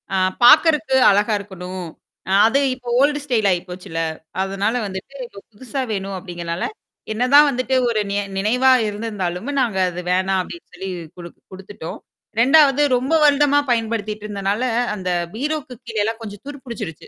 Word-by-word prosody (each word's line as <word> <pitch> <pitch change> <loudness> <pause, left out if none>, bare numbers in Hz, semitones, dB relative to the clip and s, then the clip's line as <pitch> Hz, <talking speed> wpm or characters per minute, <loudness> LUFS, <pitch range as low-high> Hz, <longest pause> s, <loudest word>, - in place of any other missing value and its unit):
அ - - +2 0.3
பார்கறக்கு 300 +1 +6
அழகா 205 +2 +2
இருக்கணும். 185 -2 -7 0.4
அ - - -1 0.2
அது 270 +5 +2 0.2
இப்ப 250 -1 -23
ஓல்ட் 290 +1 +3
ஸ்டைல் 230 -7 +1
ஆயிப்போச்சுல்ல. 180 -2 -4 0.4
அதனால 195 +3 -1
வந்துட்டு 190 +8 -8
இப்ப 200 - -13
புதுசா 260 +5 -5
வேணும் 195 -1 -3
அப்டிங்கனால, 175 -1 -5 0.5
என்னதான் 275 +6 +5
வந்துட்டு 255 0 -1
ஒரு 215 -2 0
ந - - -1 0.2
நினைவா 250 +6 +3 0.2
இருந்திருந்தாலும 205 +1 -4
நாங்க 225 -6 -1
அது 180 0 -6
வேணாம் 190 +1 +1
அப்டின்னு 340 - -10
சொல்லி 190 +2 -6 0.3
குடுக் 170 -1 -11
குடுத்துட்டோம். 190 -3 -9 0.4
2வது 285 +1 +5 0.2
ரொம்ப 265 +6 -2
வருடமா 290 0 +4
பயன்படுத்திட்டு 215 -2 -2
இருந்தனால, 200 +3 -2 0.3
அந்த 185 -3 -4 0.3
பீரோக்கு 290 0 -3
கீழேல்லாம் 225 0 -2
கொஞ்சம் 205 -3 -9
துரு 290 - -7
புடிச்சுருச்சு. 215 -10 -7
215 Hz, 140 wpm, -20 LUFS, 190-260 Hz, 0.5 s, பார்கறக்கு